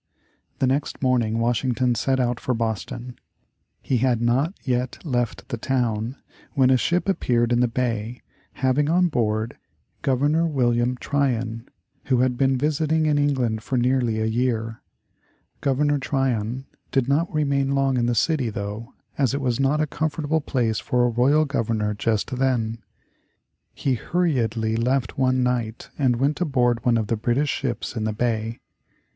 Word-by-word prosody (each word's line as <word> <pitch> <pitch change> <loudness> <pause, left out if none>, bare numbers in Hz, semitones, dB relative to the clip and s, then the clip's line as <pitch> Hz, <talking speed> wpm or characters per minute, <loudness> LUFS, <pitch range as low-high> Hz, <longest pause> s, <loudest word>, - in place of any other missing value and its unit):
The - - +1
next 135 +2 -1
morning 120 -4 +2
Washington 120 +1 +1
set 130 +3 0
out 120 -1 0
for 125 - -1
Boston. 115 +2 -4 0.7
He 130 - +1
had 125 -1 +2
not 130 - +1
yet 125 -1 -1
left 120 -5 -2
the 120 -4 -4
town 120 -2 -1 0.4
when 130 -3 +4
a - - +6
ship 175 +9 0
appeared 120 -11 +1
in 120 - +3
the 125 - +3
bay 115 -1 -2 0.3
having 135 +3 +1
on 175 +1 +3
board 110 -4 -1 0.4
Governor 145 +5 +2
William 125 -4 +1
Tryon, 125 -5 -1 0.4
who 130 -2 +2
had 125 -1 +2
been 135 +1 +2
visiting 155 +3 +1
in 150 -1 +2
England 130 -6 +1
for 130 +3 -2
nearly 120 -2 +1
a 110 - 0
year. 115 -1 -1 0.8
Governor 145 +1 +1
Tryon 130 -2 -1 0.3
did 135 -3 +1
not 150 +5 +1
remain 140 -3 +1
long 135 -1 +2
in 120 -1 +1
the 120 - +1
city 135 0 +1
though, 105 +4 -6 0.2
as 135 -1 +2
it - - -1
was 125 -3 -1
not 135 +3 +2
a - - +2
comfortable 155 +1 -1
place 120 -6 0
for 125 -1 +1
a - - +2
royal 140 +7 +3
Governor 115 -6 -1
just 110 +4 -1
then. 120 -4 0 1.0
He 135 - 0
hurriedly 115 - 0
left 125 +3 0
one 130 -1 +2
night 120 -3 -2
and 130 -4 +3
went 140 +7 0
aboard 125 -7 +1
one 120 -1 +3
of 110 - 0
the 115 - 0
British 120 +7 0
ships 125 -3 -3
in 110 -2 -2
the 110 - -1
bay. 115 0 -2
125 Hz, 160 wpm, -23 LUFS, 115-140 Hz, 1.0 s, a